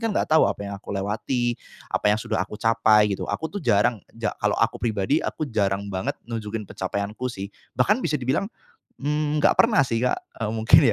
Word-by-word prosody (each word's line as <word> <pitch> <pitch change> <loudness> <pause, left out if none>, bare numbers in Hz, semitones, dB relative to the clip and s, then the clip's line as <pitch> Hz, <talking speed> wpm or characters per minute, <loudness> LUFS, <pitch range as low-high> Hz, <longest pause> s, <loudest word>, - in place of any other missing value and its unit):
nggak - - 0
tahu 160 - +6
apa 100 - -3
yang 100 0 -5
aku 100 - -6
lewati, 115 +5 -1 0.3
apa - - +1
yang 105 +1 +4
sudah 110 -1 -2
aku 100 +3 -3
capai 105 -1 +4
gitu. - - -4
Aku 160 - -3
tuh 205 - -4
jarang 110 - +2 0.2
ja 115 -2 -1
kalau 105 0 +1
aku 115 - +1
pribadi, 110 +6 +1
aku - - -3
jarang 100 -6 -1
banget 95 0 -2
nunjukin 115 -2 -4
pencapaianku 100 +6 -3
sih 100 -4 -6 0.2
bahkan 200 - +3
bisa 155 - 0
dibilang, 135 +8 0 0.5
mmm, 150 +1 0
nggak - - +4
pernah 230 -6 +5
sih 115 -3 -1
Kak, 125 - +2 0.3
eee, 105 - -1
mungkin 110 -1 +6
115 Hz, 190 wpm, -24 LUFS, 105-130 Hz, 0.5 s, tahu